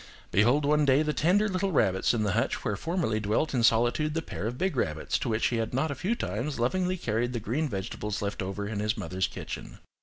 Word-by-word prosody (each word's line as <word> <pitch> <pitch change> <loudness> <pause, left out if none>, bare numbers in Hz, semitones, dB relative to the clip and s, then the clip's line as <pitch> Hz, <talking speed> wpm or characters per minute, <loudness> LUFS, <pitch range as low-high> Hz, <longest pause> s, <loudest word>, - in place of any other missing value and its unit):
behold 120 +9 +3
one 150 +1 +3
day 140 +1 +4
the 150 0 0
tender 190 +8 +3
little 190 0 -1
rabbits 95 - +2
in 115 -3 0
the 105 - +1
hutch - - -1
where - - 0
formerly 165 -11 -1
dwelt 110 +9 0
in 125 - +2
solitude 120 +7 +3
the 165 - 0
pair 110 - -4
of 120 +2 -4
big 190 +1 0
rabbits 80 -10 -1
to - - -2
which 110 0 +1
he 120 - -1
had 115 +1 -2
not 145 +3 +1
a - - 0
few 185 - -1
times 135 - -3
lovingly 180 +9 +1
carried 120 -3 -1
the 120 - -1
green 140 +9 -1
vegetables 105 +1 -4
left 100 -1 -3
over 100 +2 -3
in 105 -1 -3
his 105 +3 0
mother's 95 -2 -1
kitchen! - - -7
120 Hz, 235 wpm, -28 LUFS, 105-155 Hz, -, day